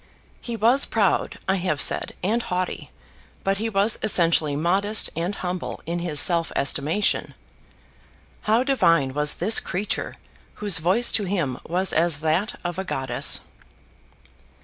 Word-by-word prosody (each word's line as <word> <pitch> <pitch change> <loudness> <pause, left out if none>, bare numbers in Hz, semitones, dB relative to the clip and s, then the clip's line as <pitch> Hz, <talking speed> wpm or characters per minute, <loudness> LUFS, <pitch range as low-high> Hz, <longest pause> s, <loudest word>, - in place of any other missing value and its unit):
He 235 - -5
was 235 +6 +3
proud, 210 -4 0
I 190 +1 +2
have 175 -5 -1
said, - - +1
and 220 +6 +1
haughty; 185 -4 -3 0.5
but 195 0 0
he 225 +1 -1
was 205 +1 +1
essentially 165 -7 +2
modest 195 +7 +1
and 175 +5 -2
humble 180 -1 -4
in 170 +1 -3
his 165 -4 -1
self 170 0 +3
estimation. 145 +8 0 1.1
How 225 +3 +4
divine 165 - +2
was 150 +1 0
this 215 +6 +3
creature, 195 +3 -3 0.4
whose 205 -5 +2
voice 190 +9 +3
to 210 - 0
him 170 -10 -2
was 185 +3 0
as 165 -2 +2
that 170 +7 0
of 175 +1 -4
a - - -2
goddess! 130 -8 -1
180 Hz, 140 wpm, -23 LUFS, 165-210 Hz, 1.1 s, How